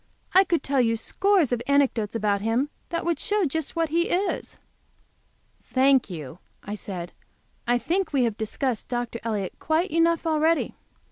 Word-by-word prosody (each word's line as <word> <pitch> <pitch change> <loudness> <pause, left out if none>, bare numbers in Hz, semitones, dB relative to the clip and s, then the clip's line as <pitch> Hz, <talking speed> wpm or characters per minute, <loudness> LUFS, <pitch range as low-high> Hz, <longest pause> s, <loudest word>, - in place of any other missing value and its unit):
I 380 +1 +7
could 340 -3 0
tell 275 -1 +2
you 230 -1 +2
scores 370 - +2
of 245 -1 0
anecdotes 270 -7 +2
about 205 -2 +1
him 235 +7 0 0.2
that 335 -1 -2
would 340 -1 0
show 415 -2 +1
just 320 0 -2
what 330 -1 0
he 340 +2 +1
is." 385 +3 -1 1.1
"Thank 265 -2 +3
you," 160 -2 -7 0.2
I 205 - -5
said, 185 -5 -5 0.6
"I 245 0 +3
think 360 +9 -1
we 275 -4 +2
have 230 -3 0
discussed 220 +2 -2
Dr. 240 -1 -3
Elliott 210 -5 -3
quite 320 +5 0
enough 335 +1 +2
already. 320 +1 +2
270 Hz, 160 wpm, -25 LUFS, 225-330 Hz, 1.1 s, I